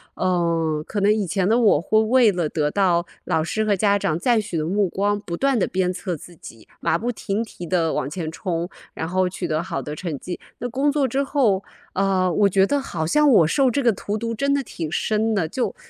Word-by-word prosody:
嗯， 165 -4 0
可 210 - -3
能 205 +2 +4
以 215 -2 -1
前 185 +1 0
的 225 +3 +3
我 210 -10 +4
会 215 +5 +3
为 230 0 +4
了 175 -5 -1
得 150 -2 0
到 180 -3 +2 0.2
老 160 - +1
师 220 +6 -1
和 210 -2 +2
家 200 +1 +2
长 160 -5 -1
赞 235 +2 +2
许 200 -5 -5
的 155 - -1
目 195 +3 +1
光， 205 +3 0
不 170 -4 -6
断 275 -2 +2
的 200 - +2
鞭 185 -1 0
策 180 -2 -4
自 175 +4 -13
己， 115 -8 -13
马 160 - +1
不 235 +6 -2
停 215 -1 -2
蹄 190 -5 -9
地 170 -2 +1
往 135 - -2
前 160 0 -4
冲， 170 0 -3 0.2
然 160 - -4
后 185 +1 +1
取 180 -1 -4
得 155 0 -1
好 - - -4
的 150 - -6
成 155 -4 -5
绩。 180 - -6 0.2
那 245 - -3
工 270 +4 +1
作 285 -2 +1
之 270 +3 0
后， 235 -9 +1 0.3
嗯， 185 -2 +1
我 205 -1 +4
觉 190 0 +4
得 285 - +1
好 165 -12 -3
像 300 - +4
我 175 -10 +6
受 265 - +3
这 280 - 0
个 235 -2 +4
荼 205 +2 -4
毒 230 +1 -3
真 280 +5 +1
的 280 - +1
挺 165 -9 -6
深 220 +4 0
的， 175 -6 0
就 245 +9 -2
195 Hz, 255 characters per minute, -22 LUFS, 170-220 Hz, 0.3 s, 我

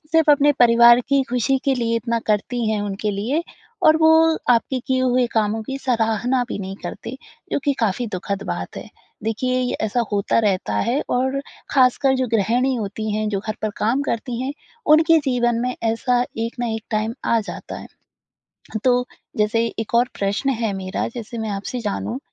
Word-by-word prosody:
सिर्फ़ 320 -2 +5
अपने 290 0 +5
परिवार 235 0 +7
की 275 -1 +3
खुशी 250 +2 +1
के 275 -1 +2
लिए 230 -2 0
इतना 230 0 -1
करती 225 +2 0
हैं 215 -1 0
उनके 205 +1 -2
लिए, 235 +12 -1 0.4
और 310 - +6
वो 320 0 +5
आपके 245 +2 +2
किए 260 -1 +1
हुए 255 -1 +2
कामों 220 0 0
की 270 +5 -5
सराहना 245 0 +1
भी - - -4
नहीं 195 0 -6
करते 255 - -6 0.4
जो - - +2
कि 285 - +3
काफ़ी 225 +2 0
दुखद 195 +2 -3
बात - - -4
है। - - -8 0.4
देखिए 255 +3 0
ये 250 - -1
ऐसा 220 +3 0
होता 200 +2 +1
रहता 190 - 0
है 240 - +1
और 265 +2 0 0.3
खासकर 265 0 +3
जो 255 - 0
गृहिणी 240 +5 +2
होती 215 0 -4
हैं, 215 0 -1
जो 205 -2 -1
घर 215 +1 -4
पर 215 - 0
काम 240 +6 +1
करती 240 -2 -3
हैं 270 - -2 0.4
उनके 320 +1 +5
जीवन 240 -2 +1
में 250 0 -1
ऐसा 245 +2 +1 0.2
एक 230 +1 -2
ना 240 - 0
एक 220 - -6
टाइम 220 +1 -1
आ 230 - +3
जाता 215 - -7
है। - - -10 1.0
तो 250 -1 +3 0.3
जैसे 220 +2 +2
एक 225 - -5
और 240 +1 +4
प्रश्न 200 +7 0
है 220 -4 0
मेरा 190 0 -3
जैसे 235 0 -6
मैं 220 -1 -3
आपसे 200 +5 -4
जानूँ 220 +4 -3
235 Hz, 185 wpm, -21 LUFS, 215-255 Hz, 1.0 s, परिवार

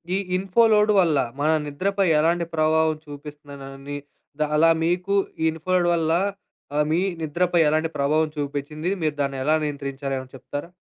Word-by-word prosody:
ఈ - - +2 0.2
info 195 +4 +2
load 210 0 +4
వల్ల 165 -5 +2 0.2
మన 155 - +2 0.2
నిద్రపై 195 +6 0
ఎలాంటి 170 +2 +2
ప్రభావం 155 0 +3
చూపిస్తుందనని 145 -1 -9 0.4
ద - - +3
అలా 165 +2 +5 0.2
మీకు 180 +3 0 0.3
ఈ - - +1
ఇన్‌ఫో 160 +3 -6
లోడ్ 175 -1 +3
వల్ల 160 -1 0 0.6
ఆహ్, 150 0 +2
మీ 165 - +2 0.2
నిద్రపై 170 +3 0
ఎలాంటి 155 +1 +1
ప్రభావం 155 +3 +2
చూపిచ్చింది? 145 +3 -3
మీరు 155 -2 0
దాన్ని 140 -1 -2
ఎలా 155 +3 +3
నియంత్రించారో 140 -1 -4
ఏమైనా 130 0 -8
చెప్తారా? 145 +4 -7
155 Hz, 155 wpm, -23 LUFS, 145-170 Hz, 0.6 s, అలా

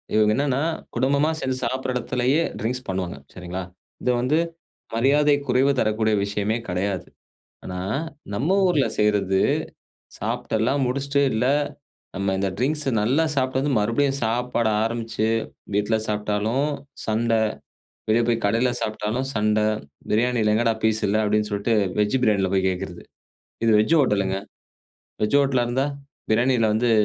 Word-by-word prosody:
இவங்க 105 0 +4
என்னன்னா 140 0 +1 0.3
குடும்பமா 140 +5 +2
சேர்ந்து 130 -2 -2
சாப்ட்ற 130 +2 -2
இடத்திலேயே 125 +3 +1 0.2
ட்ரிங்க்ஸ் 125 +3 -3
பண்ணுவாங்க, 90 -5 -3 0.2
சரிங்களா. 90 +1 -5 0.4
இது 125 - +1
வந்து 140 +5 +2 0.6
மரியாதை 145 +5 +4
குறைவு 135 +3 +3
தரக்கூடிய 110 0 +1
விஷயமே 105 +2 -1
கடையாது. 95 +1 -2 0.6
ஆனா, 90 0 -5 0.6
நம்ம 155 - +1
ஊர்ல 150 -9 +3
செய்றது, 100 -2 +2 0.8
சாப்ட்டெல்லாம் 130 +6 0
முடிச்சுட்டு 140 +2 0
இல்ல 110 +3 +1 0.7
நம்ம 100 0 0
இந்த 95 0 0
ட்ரிங்க்ஸ் 150 +4 0 0.2
நல்லா 130 +10 +2
சாப்ட்டு 130 0 +1
வந்து, 145 0 0
மறுபடியும் 135 +6 +1
சாப்பாடு 120 0 0
ஆரம்பிச்சு 115 -1 -1 0.5
வீட்ல 105 +2 +2
சாப்ட்டாலும் 105 +6 0 0.4
சண்ட, 115 +2 0 0.8
வெளியே 115 +2 +4
போய் 115 -1 0
கடையில 115 +4 +2
சாப்ட்டாலும் 110 +4 -2
சண்ட, 105 0 +2 0.5
பிரியாணியில 115 -1 +2
எங்கடா 115 0 +2
பீஸ் 110 0 +2
இல்ல 105 - +2
அப்டின்னு 105 0 +1
சொல்ட்டு 100 +3 0 0.3
வெஜ் 105 +5 +2
பிரியாணியில 100 -4 +2
போய் 95 0 +2
கேட்கறது. 90 -1 -5 0.6
இது 115 - +4
வெஜ் 135 +10 +3
ஹோட்டலுங்க. 100 -6 +1 0.9
வெஜ் 105 +7 +3
ஹோட்டலா 135 -3 +2
இருந்தா 130 +3 +1 0.4
பிரியாணியில 120 +1 +3
வந்து 120 +2 +2
115 Hz, 130 wpm, -23 LUFS, 105-130 Hz, 0.9 s, இவங்க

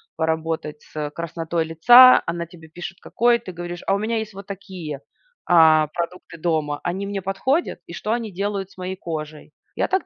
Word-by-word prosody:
поработать 160 -1 -2
с, - - -22
э, 150 -1 -3
краснотой 165 0 -3
лица. 240 +11 +8
Она 170 0 -3
тебе 160 -1 -15
пишет 175 +3 -8
какой, 240 +1 +2
ты 225 -5 -9
говоришь: 175 0 -6
"А 195 - +2
у - - +1
меня 220 +3 -1
есть 220 -1 -4
вот 195 0 -10
такие, 185 -7 -7 0.5
а, 160 -3 +6
продукты 170 0 -5
дома. 155 -3 -1
Они 185 +3 -2
мне 200 -1 -3
подходят? 195 - -1
И - - -10
что 210 - -3
они 230 -3 -3
делают 195 0 -3
с - - -21
моей 185 0 -4
кожей?" 155 -4 -7 0.2
Я - - 0
так 380 0 0
175 Hz, 190 wpm, -22 LUFS, 160-200 Hz, 0.5 s, лица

